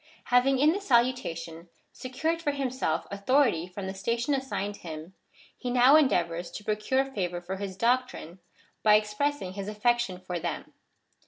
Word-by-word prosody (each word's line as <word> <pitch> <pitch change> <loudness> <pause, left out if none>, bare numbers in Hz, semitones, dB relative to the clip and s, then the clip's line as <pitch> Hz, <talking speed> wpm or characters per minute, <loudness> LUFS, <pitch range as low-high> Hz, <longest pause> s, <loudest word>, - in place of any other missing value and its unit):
Having 265 +2 +5
in 295 +4 +5
the 400 - -3
salutation 205 - 0 0.2
secured 315 +6 -2
for 290 -3 0
himself 260 - -1
authority 200 - +2
from 190 +2 -7
the 190 - -4
station 235 +7 -1
assigned 205 -7 -3
him, 160 +1 -8 0.4
he 250 - -5
now 250 +3 +6
endeavours 175 - +2
to 210 - -8
procure 215 +6 0
favour 180 -9 -3
for 180 +2 -6
his 190 -1 -6
doctrine, 235 -7 -1 0.4
by 210 -1 +6
expressing 210 0 -1
his 200 0 -6
affection 215 -2 0
for 180 -1 -5
them. 170 +1 -5
215 Hz, 150 wpm, -28 LUFS, 185-260 Hz, 0.4 s, now